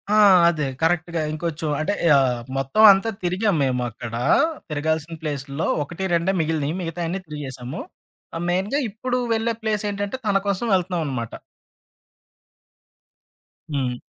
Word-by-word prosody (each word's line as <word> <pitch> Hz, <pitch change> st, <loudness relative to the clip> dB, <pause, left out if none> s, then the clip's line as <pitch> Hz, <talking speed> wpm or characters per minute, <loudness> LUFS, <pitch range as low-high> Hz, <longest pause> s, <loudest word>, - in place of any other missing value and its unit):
ఆ! -, -, +5 dB, 0.3 s
అదే. 150 Hz, -4 st, -1 dB
కరెక్ట్‌గా 170 Hz, 0 st, +1 dB
ఇంకొంచెం 155 Hz, 0 st, -3 dB
అంటే 155 Hz, +6 st, 0 dB, 0.2 s
ఆహ్, 125 Hz, -3 st, +2 dB, 0.2 s
మొత్తం 135 Hz, +11 st, +2 dB
అంతా 195 Hz, +3 st, +2 dB
తిరిగాం 185 Hz, +2 st, +1 dB
మేము 125 Hz, -2 st, 0 dB
అక్కడ. 115 Hz, 0 st, -8 dB, 0.6 s
తిరగాల్సిన 160 Hz, +2 st, -1 dB
ప్లేసుల్లో 140 Hz, 0 st, -3 dB, 0.2 s
ఒకటి 175 Hz, +6 st, -7 dB
రెండే 170 Hz, +3 st, +2 dB
మిగిలినయి. 155 Hz, -1 st, -1 dB
మిగతాయన్నీ 175 Hz, +2 st, -3 dB
తిరిగేసాము. 135 Hz, -4 st, -6 dB, 0.7 s
మెయిన్‌గా 190 Hz, +10 st, 0 dB
ఇప్పుడు 250 Hz, +4 st, -2 dB
వెళ్ళే 225 Hz, +1 st, 0 dB
ప్లేసేంటంటే 210 Hz, 0 st, -2 dB
తన 200 Hz, -1 st, +3 dB
కోసం 200 Hz, +3 st, 0 dB
వెళ్తనాం 180 Hz, -2 st, +1 dB
అనమాట. 120 Hz, -5 st, -3 dB, 2.4 s
హ్మ్. 125 Hz, -3 st, -1 dB
165 Hz, 115 wpm, -23 LUFS, 145-195 Hz, 2.4 s, ఆ